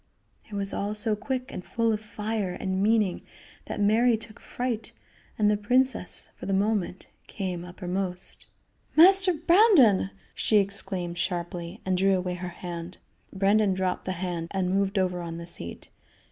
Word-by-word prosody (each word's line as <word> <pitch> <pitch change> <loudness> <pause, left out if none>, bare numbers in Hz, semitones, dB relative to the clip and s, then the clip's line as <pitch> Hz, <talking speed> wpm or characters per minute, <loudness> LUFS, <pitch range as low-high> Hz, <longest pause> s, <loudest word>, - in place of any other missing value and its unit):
It - - -13
was 200 -1 -1
all 205 +1 -2
so 215 0 0
quick 255 +4 -4
and 180 - -6
so - - -22
full 230 -1 +1
of 210 - -3
fire 210 -3 -3
and 190 0 -2
meaning 210 -3 +2 0.4
that - - -5
Mary 225 +3 +4
took 215 0 -9
fright, 245 -3 -4 0.4
and 210 - +3
the - - +3
princess, 245 0 +1
for - - -8
the 195 - +1
moment, 195 -2 -1 0.2
came 185 -4 -4
uppermost. 180 0 -5 0.5
"Master 375 +3 +7
Brandon!" 335 - +5 0.2
she 215 - +2
exclaimed 190 -3 -1
sharply, 175 -1 -4
and 185 -1 +1
drew 195 0 +3
away 180 0 -2
her 180 0 -5
hand. 175 0 -7 0.3
Brandon 200 0 +2
dropped 185 -1 -2
the 185 - -2
hand 175 -2 -4
and 185 -1 -1
moved 195 +1 0
over 180 -2 0
on 165 -1 -6
the 170 - -7
seat. 85 - -1
195 Hz, 160 wpm, -27 LUFS, 180-220 Hz, 0.5 s, Master